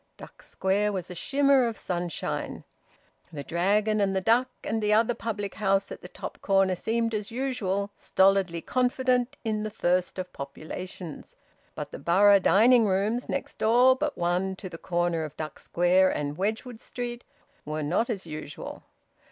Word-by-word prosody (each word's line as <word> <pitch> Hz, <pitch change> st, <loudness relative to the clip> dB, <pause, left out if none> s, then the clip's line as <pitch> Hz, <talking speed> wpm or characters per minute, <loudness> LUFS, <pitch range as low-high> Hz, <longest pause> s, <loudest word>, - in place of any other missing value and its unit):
Duck -, -, -13 dB
Square 205 Hz, +2 st, 0 dB
was 185 Hz, -2 st, -4 dB
a -, -, -4 dB
shimmer 275 Hz, +6 st, +3 dB
of 225 Hz, -2 st, -4 dB
sunshine. 175 Hz, -2 st, -3 dB, 0.7 s
The 145 Hz, -3 st, -6 dB
Dragon 205 Hz, +7 st, +1 dB
and 195 Hz, -1 st, +1 dB
the -, -, +2 dB
Duck 235 Hz, +7 st, +3 dB
and 220 Hz, 0 st, -1 dB
the 210 Hz, 0 st, +1 dB
other 225 Hz, +3 st, +4 dB
public 205 Hz, -4 st, -4 dB
house 195 Hz, -2 st, 0 dB
at -, -, -7 dB
the -, -, -9 dB
top -, -, -8 dB
corner 195 Hz, -1 st, +3 dB
seemed 230 Hz, +5 st, -1 dB
as 210 Hz, -1 st, -3 dB
usual, 215 Hz, -6 st, -2 dB
stolidly 190 Hz, -3 st, +2 dB
confident 255 Hz, +2 st, +1 dB
in 215 Hz, -2 st, -1 dB
the 215 Hz, -, -3 dB
thirst 180 Hz, -3 st, 0 dB
of 185 Hz, -1 st, -5 dB
populations. 155 Hz, +4 st, -8 dB, 0.4 s
But -, -, -6 dB
the -, -, -7 dB
Borough 200 Hz, +3 st, +5 dB
Dining 225 Hz, +4 st, +5 dB
Rooms, 205 Hz, +6 st, 0 dB
next 275 Hz, -, -4 dB
door 245 Hz, +4 st, +5 dB
but 295 Hz, +2 st, -2 dB
one 180 Hz, +2 st, 0 dB
to 185 Hz, 0 st, -8 dB
the 165 Hz, -2 st, -9 dB
corner 175 Hz, -2 st, 0 dB
of 155 Hz, -1 st, -8 dB
Duck 155 Hz, -2 st, -6 dB
Square 180 Hz, +2 st, +3 dB
and 145 Hz, 0 st, -3 dB
Wedgwood 220 Hz, +5 st, -3 dB
Street, 240 Hz, -1 st, -6 dB, 0.4 s
were 155 Hz, 0 st, -3 dB
not 180 Hz, +11 st, 0 dB
as 200 Hz, -6 st, -3 dB
usual. 155 Hz, -2 st, -7 dB
200 Hz, 165 wpm, -27 LUFS, 180-230 Hz, 0.7 s, Borough